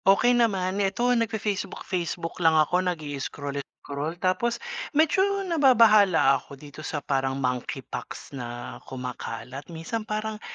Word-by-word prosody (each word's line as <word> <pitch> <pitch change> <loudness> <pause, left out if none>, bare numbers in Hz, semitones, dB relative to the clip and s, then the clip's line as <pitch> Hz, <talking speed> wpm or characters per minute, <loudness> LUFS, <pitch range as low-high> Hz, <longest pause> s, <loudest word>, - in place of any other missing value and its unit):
Okey 200 +6 +5
naman. 200 -5 +2
Ito 235 +6 +2
nagfa-Facebook-Facebook 195 -6 -2
lang 160 -1 +5
ako 165 +4 +3
nagi-scroll-scroll. 145 0 -5
Tapos, 185 +7 +1 0.4
medyo 320 +4 +4 0.2
nababahala 215 - +5
ako 140 - -12
dito 145 +2 -11
sa 150 -2 -4
parang 135 -1 0
monkeypox 125 0 -4
na 120 -2 -6
kumakalat, 125 0 -6
minsan 170 +7 -4
parang, 215 0 -4
175 Hz, 110 wpm, -26 LUFS, 140-215 Hz, 0.4 s, Okey